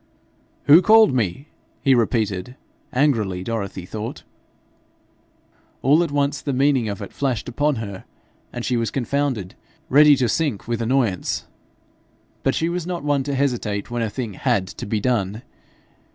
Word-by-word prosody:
'Who 155 +5 +8
called 220 -4 +6
me?' 120 - -1 0.4
he 135 - +5
repeated 110 -2 0 0.4
angrily, 110 -10 +1
Dorothy 100 -4 -4
thought. 110 +4 -6 1.6
All 145 +6 +5
at 170 - -2
once 145 0 0
the 140 - -2
meaning 135 -3 +2
of 100 +1 -5
it - - -9
flashed 130 -6 -2
upon 145 +4 0
her, 100 -5 -6 0.5
and 120 - -5
she 125 - 0
was 115 -1 0
confounded 130 -7 -2 0.4
ready 150 +2 +7
to 130 -3 +1
sink 140 -8 -1
with 120 -1 -2
annoyance. 115 -6 0 1.0
But - - +1
she 165 - 0
was 175 0 -3
not 175 -4 -4
one 145 -2 +1
to 140 -1 -2
hesitate 120 -6 -1
when 120 0 -2
a 115 - -1
thing 115 -1 -5
HAD 95 +1 0
to - - -7
be 110 +1 0
done. 110 -1 -1
125 Hz, 150 wpm, -22 LUFS, 105-140 Hz, 1.6 s, Who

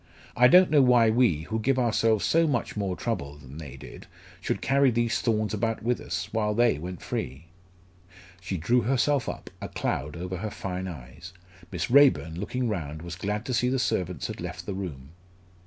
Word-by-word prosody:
I 125 +1 +6
don't 180 +6 +6
know 150 -2 +6
why 120 -3 +5
we, 110 -10 +3
who 110 +6 -3
give 130 +4 +1
ourselves 115 -3 +2
so 165 0 +3
much 125 -6 -1
more 100 -3 -2
trouble 75 -13 -4
than 70 +1 -11
they 70 -4 -9
did, - - -11 0.3
should - - -2
carry 135 0 +3
these 120 -1 0
thorns 110 -2 0
about 115 +1 -1
with 120 +1 0
us, - - -4
while 105 -2 0
they 120 -9 +3
went 90 +2 -7
free." 65 +6 -4 0.9
She 95 0 -4
drew 120 +10 +2
herself 135 +2 +1
up, - - -7
a - - -5
cloud 75 +3 -3
over 90 +2 -4
her 110 +5 -4
fine 95 -2 -5
eyes. 80 +3 -10 0.4
Miss - - -3
Raeburn, 125 - +4
looking 125 +5 -2
round, 80 -7 -4
was 85 -1 -6
glad 105 +5 -3
to 130 - -3
see 125 +1 +2
the 135 - +1
servants 90 - -1
had - - -5
left - - -6
the 100 - -4
room. 80 -9 -6
105 Hz, 190 wpm, -27 LUFS, 85-120 Hz, 0.9 s, I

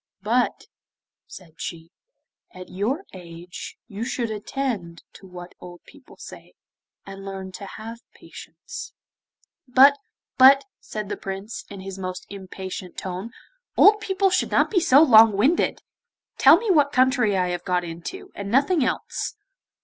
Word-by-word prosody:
'But,' - - 0 0.6
said 170 -4 -13
she, 165 -1 -7 0.6
'at 185 0 -10
your 220 - -2
age, 175 -1 -10
you 215 -1 -6
should 235 -2 -3
attend 210 -6 -4
to 195 - -14
what 180 -1 -11
old 175 -1 -12
people 290 -3 -18
say, - - -12 0.5
and 195 0 -10
learn 190 -1 -7
to 200 +2 -9
have 225 +3 -9 0.2
patience.' - - -11 0.7
'But, 275 +3 +6 0.4
but,' 270 +2 +7
said 215 -1 -6
the - - -4
Prince, 195 +2 -7
in 200 -2 -9
his 195 0 -8
most 185 -1 -6
impatient 190 -2 -8
tone, 185 +4 -5 0.5
'old 420 +1 +7
people 385 -1 +1
should 365 - +1
not - - +2
be 390 - +3
so 290 -3 +6
long 225 -7 +7
winded! 280 +12 +1 0.6
Tell - - +8
me 450 -4 -1
what 290 -5 +3
country 255 -6 +2
I 180 -1 0
have 175 -1 -4
got 180 -1 0
into, 175 - -8
and 200 0 -6
nothing 280 - +2
else. - - -3
205 Hz, 145 wpm, -23 LUFS, 185-270 Hz, 0.7 s, Tell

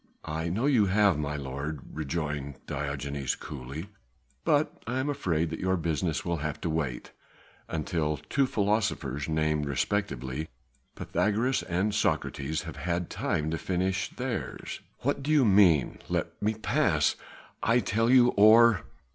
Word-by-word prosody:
"I 80 +1 -2
know 110 +10 0
you 125 -8 +4
have, 100 -4 +3
my 75 0 -2
lord," 70 +2 -4
rejoined 75 -2 -3
Diogenes 70 -2 -3
coolly, 75 +5 -7 0.5
"but 150 0 +1
I 125 +2 -1
am 145 +2 0
afraid 85 - -1
that - - -4
your 95 0 +1
business 80 0 -1
will 85 -1 0
have 75 0 -3
to 85 - -1
wait 70 -6 -3 0.6
until 80 -2 -1
two 135 - 0
philosophers 100 - 0
named 75 -1 +1
respectively 70 -3 -2 0.5
Pythagoras 115 +5 0
and 95 +5 -1
Socrates 75 -3 -1
have 80 -2 -8
had 85 +3 -2
time 75 +1 -1
to 80 - -2
finish 95 +1 -1
theirs." - - -4 0.2
"What 140 +2 0
do 140 - -4
you 150 -4 +5
mean? 95 - +4
Let - - -2
me 110 +1 +1
pass, 110 - +2 0.5
I 115 +2 +3
tell 115 -1 +1
you, 125 -1 +7
or...." 110 -1 +6
85 Hz, 140 wpm, -28 LUFS, 75-105 Hz, 0.6 s, you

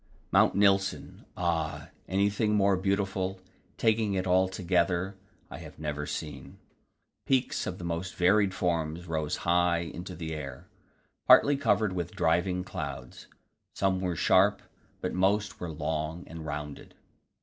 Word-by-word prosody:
Mount - - +4
Nilsen 100 -1 +1
ah! 80 -4 -2 0.2
anything 100 +3 +1
more 100 -1 +4
beautiful, 95 0 -1 0.4
taking 110 -3 +2
it 95 -1 -1
altogether, 90 0 +1 0.4
I - - -7
have - - -11
never 75 -1 -4
seen. 75 -4 -6 0.7
Peaks 130 -1 +1
of 90 - -4
the - - -9
most 85 +2 -3
varied 95 +2 +3
forms 85 -2 -2
rose 80 -3 -2
high 85 0 +3
into 90 +2 -7
the 80 -1 -5
air, 70 -5 -7 0.6
partly 145 - +7
covered 105 -6 +1
with 90 +1 -4
driving 90 0 +1
clouds. 65 -8 -7 0.5
Some 95 -1 +1
were 90 -2 -1
sharp, 95 +5 +3 0.4
but - - -2
most 100 +3 +1
were 90 - -4
long 80 +2 -3
and 80 -1 -8
rounded. 75 -1 -6
90 Hz, 130 wpm, -29 LUFS, 80-95 Hz, 0.7 s, partly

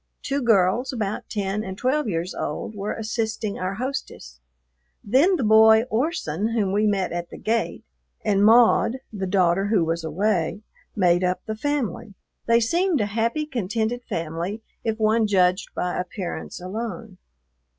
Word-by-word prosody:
Two 280 +1 -1
girls, 225 +1 +2
about 215 -5 -3
ten 205 0 -2
and 190 -1 -6
twelve 260 +1 0
years 170 0 -2
old, - - -4
were 205 0 -4
assisting 220 -1 -3
our 185 +2 -2
hostess; 225 - -5 0.6
then 275 - +4
the 275 - -1
boy 220 +1 +6
Orson, 220 - -1
whom 205 -5 +1
we 210 +2 +2
met 195 -3 0
at 175 0 -4
the - - -10
gate, 230 +1 -1 0.4
and 200 -2 +3
Maud, 230 +2 +5 0.2
the 195 -2 -3
daughter 185 0 +2
who 205 -6 +2
was 165 +1 -2
away, 180 +3 -1 0.3
made 175 -2 +3
up 180 0 -1
the 220 - -3
family. 230 -6 -3 0.3
They 230 0 +5
seemed 335 +7 +1
a 210 - +1
happy, 230 +8 -1
contented 230 -2 -2
family, 170 +7 -4 0.2
if 220 -1 -1
one 220 0 +2
judged 185 -1 +2
by 180 0 -2
appearance 180 0 -5
alone. 195 0 -6
210 Hz, 150 wpm, -24 LUFS, 185-230 Hz, 0.6 s, boy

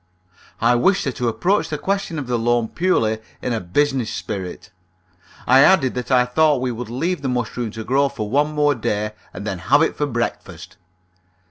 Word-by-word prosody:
I 120 +2 +3
wished 185 +12 +2
her 135 - 0
to 125 -1 -3
approach 180 - +1
the 150 - -2
question 195 -1 -2
of 145 - -3
the 120 -1 -1
loan 120 -1 +1
purely 115 -12 +1 0.2
in 125 - -2
a 115 - -1
business 130 +6 0
spirit. 95 -3 -6 0.7
I 130 +1 +6
added 150 -3 +5
that 125 -1 -5
I 125 -2 +4
thought 150 +2 +2
we 125 0 -1
would 120 -1 -6
leave 165 +8 -2
the 135 - -2
mushroom 120 -1 -2
to 110 +1 -7
grow 135 +4 +2
for 110 -7 -5
one 145 +6 +1
more 150 -1 +2
day, 105 -3 -2 0.2
and 100 +3 -8
then 95 -4 -3
have 145 - +3
it - - 0
for 145 - -1
breakfast. 120 -2 -5
125 Hz, 195 wpm, -21 LUFS, 115-145 Hz, 0.7 s, I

